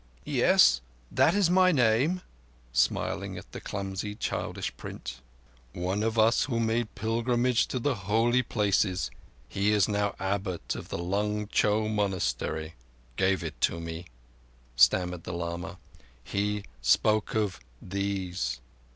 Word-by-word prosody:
"Yes, 65 -2 +5 0.3
that 165 - +4
is 200 -3 +4
my 185 0 +5
name," 135 +6 +2 0.5
smiling - - 0
at - - -11
the - - -7
clumsy, 100 +1 -4
childish - - -3
print. 65 +1 -8 0.5
"One 95 +4 -1
of 115 +1 -1
us 110 +2 +4
who 135 -5 -3
had 115 0 +1
made 115 0 -1
pilgrimage 120 +2 +1
to - - -3
the 135 +3 +1
Holy 115 +5 +2
Places—he 95 - -1
is 105 -2 +3
now 105 -1 0
Abbot 95 -2 -2
of - - -8
the - - -3
Lung 105 +4 -1
Cho 110 0 +2
Monastery—gave 85 - -2
it 80 -2 0
me," 85 +1 -6 0.7
stammered 90 +8 +3
the 90 - -5
lama. 85 +2 -4 0.5
"He 105 +4 -1 0.2
spoke 105 - +2
of 105 -5 0 0.2
these." 95 -8 -3
100 Hz, 125 wpm, -28 LUFS, 90-110 Hz, 0.7 s, Yes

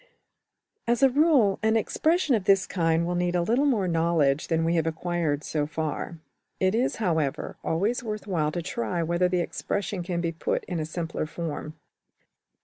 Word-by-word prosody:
As 235 +2 +2
a 270 - +6
rule 275 - +4
an 220 +1 +3
expression 315 - +1
of 210 -5 +1
this 195 -1 +4
kind 165 -2 +1
will 175 - -1
need 175 0 0
a 175 - +2
little 245 +10 +2
more 215 -9 +2
knowledge 165 -4 +2
than 165 0 +1
we 165 - +2
have 165 -2 +1
acquired 160 -3 -1
so 150 -2 -1
far; 155 +1 -3 0.5
\DPPageSep{043.png}% 190 - +3
it 185 - +1
is, 245 +4 +1
however, 160 -9 -1
always 210 +10 0
worth 215 -3 -4
while 160 -7 0
to 175 +1 -3
try 180 -2 -2
whether 170 +2 +1
the 180 -1 +1
expression 195 +2 -3
can 175 0 -2
be 170 -1 -1
put 165 - -2
in 175 - -4
a 155 - -3
simpler 165 -1 -3
form. 155 -1 -5
175 Hz, 185 wpm, -26 LUFS, 160-210 Hz, 0.5 s, a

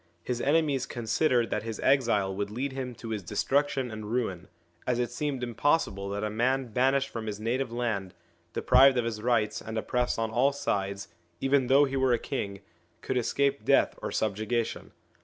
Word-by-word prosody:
His 120 +2 -2
enemies 145 -3 +2
considered 120 +1 +1
that - - 0
his 110 -1 -6
exile 115 -8 +2
would 100 +1 -2
lead 130 +2 -4
to 115 - -8
his 110 -2 -2
destruction 135 - 0
and 110 -1 -6
ruin, 95 -8 -2 0.4
as 125 -1 +1
it 120 0 -1
seemed 135 0 -3
impossible 120 -4 0
that 100 +1 -3
a 105 - 0
man 125 +3 0
banished 135 +2 +2
from 115 -1 -6
his 105 -1 -4
native 120 +3 -1
land, 115 -6 -2 0.4
deprived 130 +1 +5
of 120 - +1
his 110 -2 -3
rights, 110 -3 +1
and 110 0 -6
oppressed 125 +2 0
on 115 -1 -1
all 130 +5 +3
sideseven 100 +3 -2
though 140 +3 +6
he 135 0 -3
were 130 -2 +3
a - - +3
king 100 -3 -4 0.4
could 130 - -3
escape 140 +3 +1
death - - +4
or - - -3
subjugation. 110 +2 -2
120 Hz, 175 wpm, -28 LUFS, 105-135 Hz, 0.4 s, though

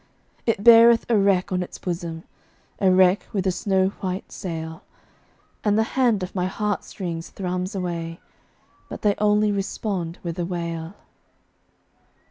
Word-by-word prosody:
It 220 -3 +1
beareth 235 0 +7
a 235 - +4
wreck 195 -3 +2
on 180 0 0
its 180 - -6
bosom, 170 -2 -4 0.6
A 195 - +4
wreck 185 +1 +4
with 195 -3 -1
a 190 - +3
snow 190 0 +1
white 185 0 -4
sail; 160 -3 -6 0.8
And 210 -1 +2
the 220 - +4
hand 240 -7 +2
on 180 - -5
my 180 -1 0
heart 205 +1 -2
strings 170 -4 -6
thrums 185 0 -3
away, 170 -2 -4 0.7
But - - -8
they 205 -1 +4
only 210 0 +3
respond 195 -3 -3
with 170 0 -4
a 175 - 0
wail. 170 0 -4
185 Hz, 145 wpm, -23 LUFS, 175-205 Hz, 0.8 s, beareth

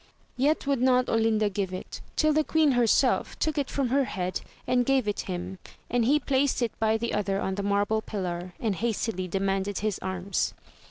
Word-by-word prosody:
Yet 290 +5 +1
would 275 -3 +1
not 255 -1 +3
Olinda 225 -1 +2
give 195 -2 -2
it, 185 - -7
till 310 -1 +3
the 310 +1 +3
queen 310 -1 +3
herself 245 -3 +2
took 310 -1 0
it 280 - -2
from 275 -3 -1
her 275 +2 +2
head 185 -5 -3 0.2
and 250 -1 +2
gave 265 -3 +2
it 205 - -1
him, 180 +1 -4 0.3
and 240 -1 +2
he 290 +5 +4
placed 270 -2 +1
it 230 - 0
by 220 0 +2
the 235 +1 -3
other 200 -1 0
on 190 - -1
the 200 - -2
marble 205 +2 +1
pillar, 180 -4 -4
and 220 -4 0
hastily 220 -4 -1
demanded 195 +1 -1
his 215 -2 -1
arms. 190 +1 -2
220 Hz, 195 wpm, -27 LUFS, 195-255 Hz, 0.3 s, he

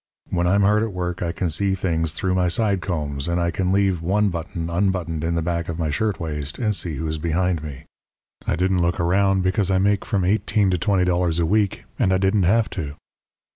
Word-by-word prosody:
When 90 -1 +1
I'm 100 +3 +3
hard 105 +2 +4
at 110 -2 -2
work 90 0 -3
I 85 - -1
can 90 -2 -2
see 95 +4 +1
things 80 -4 -1
through 90 +3 -1
my 90 -1 +2
side 100 +1 +1
combs; 75 -4 -3
and 85 0 0
I 85 0 +1
can 90 +2 -1
leave 95 -3 +2
one 100 +4 +2
button 85 -1 -4
unbuttoned 85 -3 -1
in 85 +1 0
the 85 - 0
back 85 0 -2
of 80 - -3
my 80 -3 -1
shirtwaist 80 -6 -2
and 105 -4 0
see 85 -5 -2
who's 80 +2 -3
behind 85 +1 0
me. 70 -4 -8 0.6
I - - +1
didn't 90 +1 +1
look 85 +1 0
around, 95 +2 +2
because 95 +1 +1
I 95 - +3
make 100 +1 +2
from 100 -5 0
eighteen 100 0 +2
to 90 - 0
twenty 95 0 +2
dollars 90 -2 +1
a 85 - +2
week, 100 +2 +1 0.2
and 95 - +3
I 95 - +3
didn't 95 0 +2
have 115 +1 +3
to. 75 -6 -5
90 Hz, 220 wpm, -22 LUFS, 85-95 Hz, 0.6 s, hard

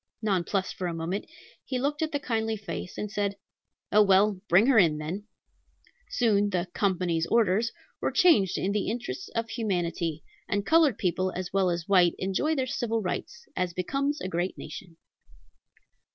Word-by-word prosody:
Nonplussed 190 -1 0
for 180 - -3
a 170 - -3
moment, 170 +5 -3 0.4
he 260 - -3
looked 290 +4 -1
at 315 0 0
the 290 - -1
kindly 225 -4 -1
face, 200 -3 -6
and 210 - -4
said, 200 -1 -1 0.6
"Oh, 210 - +6
well, 195 -1 +4
bring 190 +6 +6
her 260 -4 +5
in 160 -5 +4
then!" 170 +7 -5 0.8
Soon 205 -4 +2
the 180 -2 -1
"company's 180 -4 0
orders" 225 0 +2 0.3
were - - 0
changed 210 - +4
in 195 - 0
the 205 -1 -1
interests 245 - -4
of 230 0 -2
humanity, 175 -7 -2 0.3
and 205 0 0
colored 320 -8 +4
people 185 0 0
as 185 0 -5
well 195 -2 +3
as 170 -1 -2
white 180 -4 +4
enjoyed 240 +12 0
their 260 - +1
civil 230 -3 -1
rights, 475 - -4
as 180 -1 -1
becomes 275 - -1
a - - -3
great 175 +1 -2
nation. 165 +2 -9
200 Hz, 165 wpm, -27 LUFS, 180-230 Hz, 0.8 s, Oh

